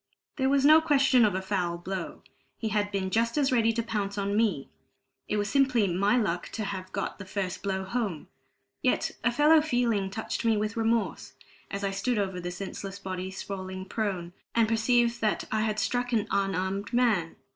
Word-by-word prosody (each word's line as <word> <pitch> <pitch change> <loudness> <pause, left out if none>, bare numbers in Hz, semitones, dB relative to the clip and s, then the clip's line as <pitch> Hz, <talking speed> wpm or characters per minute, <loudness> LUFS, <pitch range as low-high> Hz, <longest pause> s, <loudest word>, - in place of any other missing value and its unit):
There 265 -1 +2
was 275 0 +3
no 310 +2 +8
question 275 -5 +4
of 205 -3 +1
a 190 - -2
foul 180 -3 -1
blow. 185 +1 -5 0.3
He 220 - -2
had 205 -1 0
been 190 -2 -2
just 230 +5 +1
as 275 -3 +2
ready 230 -2 +3
to 230 +1 -1
pounce 205 -3 -3
on 200 0 -1
me; 205 -11 +1 0.6
it 210 - -1
was 205 0 0
simply 260 -4 +3
my 200 +7 +2
luck 180 -7 -1
to 220 - -3
have 190 -2 -5
got 195 - -4
the - - -6
first 190 -1 -3
blow 190 -1 -2
home. 195 -5 -3 0.5
Yet 255 - +1
a 235 - +3
fellow 300 +5 +5
feeling 240 -9 +1
touched 215 +3 -4
me 225 -2 +3
with 215 +1 -2
remorse, 225 0 -1 0.4
as 200 0 -4
I 200 - 0
stood 230 +5 -1
over 190 -3 -1
the 175 0 -4
senseless 195 +1 -6
body, 185 -1 -5
sprawling 190 -1 -6
prone, 190 -4 -3 0.2
and 230 -1 +4
perceived 235 +1 +2
that 215 -1 +1
I 220 - +1
had 215 -1 0
struck 245 +2 -1
an 215 -3 +1
unarmed 195 +1 -1
man. 220 -9 +2
205 Hz, 190 wpm, -28 LUFS, 190-235 Hz, 0.6 s, no